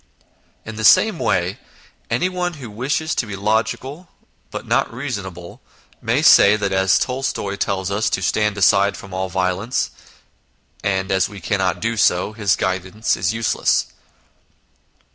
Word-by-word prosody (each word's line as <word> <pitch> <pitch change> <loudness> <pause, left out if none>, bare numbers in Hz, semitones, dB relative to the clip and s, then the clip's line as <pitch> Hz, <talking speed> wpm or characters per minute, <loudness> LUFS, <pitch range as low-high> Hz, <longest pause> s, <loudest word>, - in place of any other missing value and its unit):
In 110 -1 -8
the 110 - -4
same - - +5
way - - 0 0.5
anyone 180 -1 -1
who 130 -7 -9
wishes 140 +8 -2
to 115 - -2
be 105 - -5
logical 115 - -2 0.4
but - - -7
not - - +1
reasonable, 100 -9 -6 0.4
may - - 0
say 100 +1 +7
that 100 -2 -2
as 95 -1 +3
Tolstoy 125 -6 -2
tells 95 -1 -2
us 105 +2 0
to 95 - -2
stand 105 +3 0
aside 100 +1 +3
from 100 -2 -11
all 95 0 -2
violence, 95 +6 -1 0.9
and 95 -1 -1
as 95 -1 +2
we 100 -2 -10
cannot 95 -1 -1
do 115 0 -1
so, 100 0 +2
his 105 -3 +1
guidance 95 +4 -1
is - - 0
useless. 115 0 0
105 Hz, 145 wpm, -20 LUFS, 95-115 Hz, 0.9 s, say